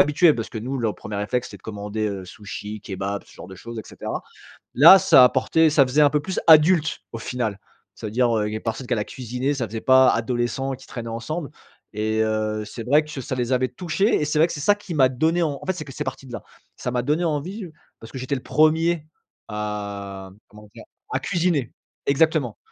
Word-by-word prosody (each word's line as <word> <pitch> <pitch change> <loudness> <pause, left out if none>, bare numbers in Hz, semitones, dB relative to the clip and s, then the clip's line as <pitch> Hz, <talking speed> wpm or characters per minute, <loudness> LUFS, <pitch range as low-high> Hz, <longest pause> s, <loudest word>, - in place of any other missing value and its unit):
habitués 150 +2 +5
parce 115 - -4
que, - - -5
nous, 130 +5 -4
le 110 -3 0
1er 105 -1 -7
réflexe, 120 +5 -1
c'était - - -11
de - - -30
commander, 105 0 -4
heu, 95 -2 -5
sushis, 105 +2 -8
kebab, 100 0 -4
ce - - -19
genre - - -10
de 95 - -10
choses 115 +5 -9
et - - -4
cetera. - - -6 0.5
Là, 165 +8 +9
ça 130 - +7
apportait, 150 +6 +3
ça 145 -2 +5
faisait 145 +4 +3
un 145 - +6
peu 150 0 +1
plus 190 +5 -4
adulte, 160 0 +5
au 115 - -5
final. 115 -4 -3 0.4
Ça - - -7
veut - - -4
dire, 120 +1 +2
heu, 105 - 0
il 105 - -5
y - - -1
a - - -5
personne 115 +3 -4
qu'elle 120 -3 0
a - - -1
cuisiné, 125 +4 -3
ça 125 -4 -2
faisait 110 +1 -6
pas 130 +1 +6
adolescents 120 +3 -1
qui 130 - -14
traînaient 120 -3 -7
ensemble 135 +8 -4 0.4
et 110 +1 -1
heu, 110 -1 -1
c'est 115 - -7
vrai 145 +4 +4
que 150 -3 -7
ça 130 - -4
les 125 -1 -2
avait 130 0 +2
touchés 175 - 0
et 150 - 0
c'est 150 - -2
vrai 160 - +6
que 170 - -6
c'est 145 - -6
ça 205 +7 +4
qui 205 -4 -9
m'a 135 -4 +5
donné, 160 +7 +1
en 145 -4 -1
en - - -9
fait, 190 - +1
c'est 175 -4 -7
que 135 - -9
c'est 150 - -4
parti 130 0 -6
de 125 - -11
là. - - -6 0.3
Ça 125 - -4
m'a 125 0 0
donné 150 +6 0
envie 175 +6 -3 0.3
parce 115 - -12
que 130 - -6
j'étais 130 +2 -2
le 130 - -5
1er 160 +1 +2 0.4
à, 100 -2 -5
mmh, - - -23
comment 105 0 -15
dire? - - -11 0.3
A - - 0
cuisiner! 165 -8 0 0.3
Exactement 140 -4 +1
125 Hz, 240 wpm, -23 LUFS, 110-150 Hz, 0.5 s, Là